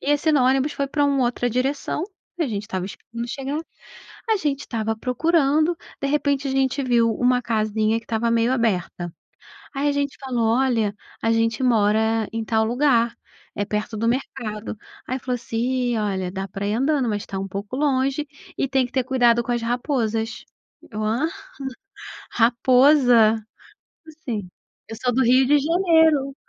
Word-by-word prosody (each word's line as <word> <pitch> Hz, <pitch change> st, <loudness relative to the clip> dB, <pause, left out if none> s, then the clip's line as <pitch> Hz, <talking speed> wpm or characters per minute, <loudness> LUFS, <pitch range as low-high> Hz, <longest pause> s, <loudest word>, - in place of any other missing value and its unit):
e 285 Hz, -, -1 dB
assim 310 Hz, +2 st, +2 dB
no 280 Hz, -, +4 dB
ônibus, 270 Hz, +3 st, +2 dB
foi 280 Hz, -, -2 dB
para 290 Hz, +1 st, 0 dB
uma 280 Hz, -2 st, +2 dB
outra 245 Hz, 0 st, 0 dB
direção. 270 Hz, +5 st, -1 dB, 0.4 s
A 330 Hz, -, +1 dB
gente 210 Hz, -5 st, -3 dB
estava 190 Hz, -4 st, -4 dB
esperando 235 Hz, +4 st, -7 dB
chegar. 275 Hz, +3 st, -3 dB, 0.7 s
A 440 Hz, -, +3 dB
gente 285 Hz, -6 st, -1 dB
estava 225 Hz, -4 st, -3 dB
procurando, 310 Hz, +6 st, +2 dB, 0.2 s
de 275 Hz, -, -1 dB
repente, 285 Hz, -1 st, 0 dB
a -, -, -1 dB
gente 265 Hz, +1 st, +1 dB
viu 240 Hz, -3 st, +3 dB
uma 250 Hz, +2 st, +2 dB
casinha 215 Hz, -1 st, 0 dB
que 230 Hz, -, -14 dB
estava 230 Hz, 0 st, 0 dB
meio 230 Hz, +1 st, +2 dB
aberta. 180 Hz, -8 st, -1 dB, 0.6 s
Aí, 285 Hz, +2 st, +1 dB
a -, -, +2 dB
gente 285 Hz, -1 st, -1 dB
falou: 235 Hz, -4 st, 0 dB
"Olha, 230 Hz, -6 st, +1 dB, 0.3 s
a 225 Hz, -, +1 dB
gente 225 Hz, +2 st, +1 dB
mora 220 Hz, -2 st, +2 dB
em 225 Hz, 0 st, -3 dB
tal 220 Hz, -1 st, +2 dB
lugar, 240 Hz, -1 st, +2 dB, 0.4 s
é 205 Hz, -, -1 dB
perto 210 Hz, +1 st, -3 dB
do 230 Hz, -, 0 dB
mercado". 230 Hz, -4 st, -3 dB, 0.3 s
Aí, 255 Hz, +1 st, -3 dB
falou 250 Hz, 0 st, -2 dB
assim: 230 Hz, -1 st, -6 dB
"Ih, 245 Hz, 0 st, 0 dB
olha, 190 Hz, -4 st, -2 dB
dá 195 Hz, +1 st, -4 dB
pra 195 Hz, +2 st, -5 dB
ir 210 Hz, -, 0 dB
andando, 270 Hz, 0 st, +1 dB
mas 205 Hz, -1 st, -2 dB
tá 195 Hz, -, -6 dB
um 195 Hz, +1 st, -3 dB
pouco 200 Hz, +5 st, -5 dB
longe 275 Hz, 0 st, +1 dB, 0.3 s
e -, -, 0 dB
tem 265 Hz, -1 st, +2 dB
que 245 Hz, -, -11 dB
ter 260 Hz, -, +1 dB
cuidado 240 Hz, -2 st, +3 dB
com 245 Hz, -, -3 dB
as 240 Hz, -1 st, 0 dB
raposas." 230 Hz, -2 st, -2 dB, 0.4 s
Eu: 215 Hz, 0 st, -4 dB
"Hã? 230 Hz, +8 st, +1 dB, 1.0 s
Raposa?" 245 Hz, -1 st, +5 dB, 0.7 s
Como 315 Hz, -1 st, -14 dB
assim? 220 Hz, -, -5 dB, 0.4 s
Eu 225 Hz, -, -6 dB
sou 250 Hz, -1 st, 0 dB
do 260 Hz, -, +2 dB
Rio 255 Hz, +2 st, +5 dB
de 290 Hz, +3 st, +4 dB
Janeiro. 320 Hz, -3 st, +3 dB
245 Hz, 175 wpm, -23 LUFS, 220-275 Hz, 1.0 s, Raposa